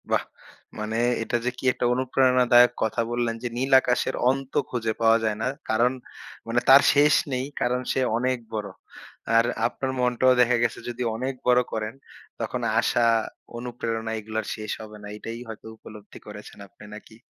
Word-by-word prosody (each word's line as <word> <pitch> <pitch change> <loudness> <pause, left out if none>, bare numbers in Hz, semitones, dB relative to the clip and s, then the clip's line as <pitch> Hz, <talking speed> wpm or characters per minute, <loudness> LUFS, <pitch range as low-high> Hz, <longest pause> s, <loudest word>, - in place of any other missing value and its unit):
বাহ! - - +1 0.6
মানে 110 +1 -3 0.3
এটা 120 - -1
যে, - - +2
কি - - -11
একটা - - -2
অনুপ্রেরণাদায়ক 125 -1 +4
কথা 110 +1 0
বললেন 120 -1 -1
যে, - - -1
নীল 135 +2 -2
আকাশের 125 -1 0
অন্ত 135 0 -2 0.2
খুঁজে 115 -3 -2
পাওয়া 115 0 +5
যায় 110 -1 0
না। - - 0 0.2
কারণ 120 +3 +3 0.6
মানে 115 +1 +1
তার 135 +1 +9
শেষ 145 +1 +5 0.2
নেই। 130 +1 -1 0.2
কারণ 125 +1 0
সে - - 0 0.2
অনেক 130 +1 0 0.2
বড়। 105 -2 -3 0.7
আর 115 +1 +5 0.2
আপনার 135 -1 -4
মনটাও 125 +1 +3
দেখা 125 0 +3
গেছে 120 - -1
যদি 120 +1 -4
অনেক 130 +4 -3
বড় 125 0 +5
করেন, 110 0 -3 0.5
তখন - - -3 0.2
আশা 120 - +2 0.5
অনুপ্রেরণা 115 -2 -4
এগুলো 110 +1 -7
আর - - -12
শেষ 110 -1 -6
হবে 110 -1 -10
না। - - -8
এটাই 115 +2 -7
হয়তো 110 -1 -10
উপলব্ধি 105 -1 -13
করেছেন 105 0 -11
আপনি - - -18
নাকি? 110 +1 -12
120 Hz, 170 wpm, -25 LUFS, 110-125 Hz, 0.7 s, তার